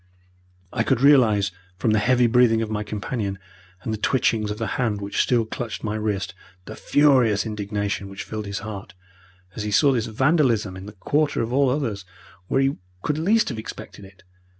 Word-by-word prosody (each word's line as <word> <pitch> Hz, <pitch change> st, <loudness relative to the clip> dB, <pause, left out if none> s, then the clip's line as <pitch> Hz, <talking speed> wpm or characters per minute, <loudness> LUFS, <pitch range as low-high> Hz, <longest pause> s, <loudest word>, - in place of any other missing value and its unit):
I 120 Hz, -, 0 dB
could 115 Hz, -, +1 dB
realize 115 Hz, -9 st, +5 dB, 0.3 s
from 110 Hz, +2 st, +1 dB
the 110 Hz, -, +3 dB
heavy 125 Hz, +3 st, +3 dB
breathing 115 Hz, -1 st, +4 dB
of 110 Hz, -, -5 dB
my 105 Hz, -1 st, -1 dB
companion, 105 Hz, -1 st, -4 dB, 0.5 s
and 110 Hz, -, -2 dB
the 110 Hz, -, -4 dB
twitchings 110 Hz, -4 st, +1 dB
of 105 Hz, -, -4 dB
the 115 Hz, -, -2 dB, 0.2 s
hand 110 Hz, -4 st, 0 dB
which 100 Hz, 0 st, -1 dB
still 120 Hz, -3 st, +2 dB
clutched 110 Hz, 0 st, -5 dB
my 105 Hz, -1 st, -2 dB
wrist, 105 Hz, -2 st, -2 dB, 0.3 s
the -, -, -8 dB
furious 130 Hz, -9 st, +3 dB
indignation 100 Hz, -2 st, -3 dB
which 95 Hz, +1 st, -7 dB
filled 110 Hz, -1 st, -6 dB
his 100 Hz, 0 st, -4 dB
heart 105 Hz, -1 st, -8 dB, 0.6 s
as -, -, -4 dB
he 105 Hz, -, -3 dB
saw 140 Hz, +7 st, +4 dB
this 115 Hz, -4 st, 0 dB
vandalism 115 Hz, -, +1 dB
in 95 Hz, +2 st, -9 dB
the 105 Hz, -, -9 dB
quarter 145 Hz, +6 st, 0 dB
of 115 Hz, +2 st, -4 dB
all 140 Hz, 0 st, +3 dB
others 120 Hz, -8 st, -2 dB, 0.4 s
where 135 Hz, -, +2 dB
he 135 Hz, +1 st, +1 dB, 0.3 s
could 150 Hz, +1 st, -1 dB
least 210 Hz, +7 st, +2 dB
have 115 Hz, -5 st, -5 dB
expected 110 Hz, -, -9 dB
it. 95 Hz, -1 st, -16 dB
110 Hz, 190 wpm, -23 LUFS, 105-125 Hz, 0.6 s, realize